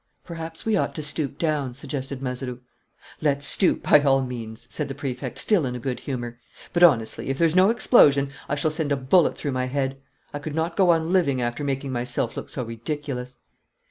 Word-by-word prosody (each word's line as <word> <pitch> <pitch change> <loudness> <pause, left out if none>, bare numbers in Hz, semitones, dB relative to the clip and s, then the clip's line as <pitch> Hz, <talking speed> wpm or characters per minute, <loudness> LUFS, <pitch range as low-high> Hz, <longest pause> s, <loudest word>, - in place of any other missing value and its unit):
"Perhaps 165 -1 -7
we 220 -1 +2
ought - - -1
to 155 - -3
stoop 145 -1 -1
down," 150 -6 -1
suggested 135 -1 -5
Mazeroux. 125 -1 -4 0.6
"Let's 140 -2 +1
stoop, 180 +6 +3
by 150 - +6
all 135 -2 +3
means," 115 -3 -7
said 150 - -4
the 135 - -6
Prefect, 135 -3 -5
still 205 -7 +3
in 125 -2 -2
a - - -5
good 125 0 -3
humour. 120 -3 -5 0.3
"But, 175 - +1
honestly, 130 -9 +4
if 135 - -1
there's 165 +1 +2
no 185 +2 +6
explosion, 140 - +5 0.2
I 145 - +1
shall 155 +2 0
send 155 -2 -2
a 140 - +2
bullet 135 +7 +3
through 145 - -3
my 130 -1 -1
head. 135 0 -2 0.3
I 145 - -4
could 150 0 -6
not 165 +1 -1
go 190 -3 +3
on 165 +1 +2
living 140 -9 +2
after 120 +3 -2
making 135 -1 -2
myself 120 -1 -1
look - - -6
so 130 - -4
ridiculous." 125 +2 -5
140 Hz, 205 wpm, -24 LUFS, 125-160 Hz, 0.6 s, by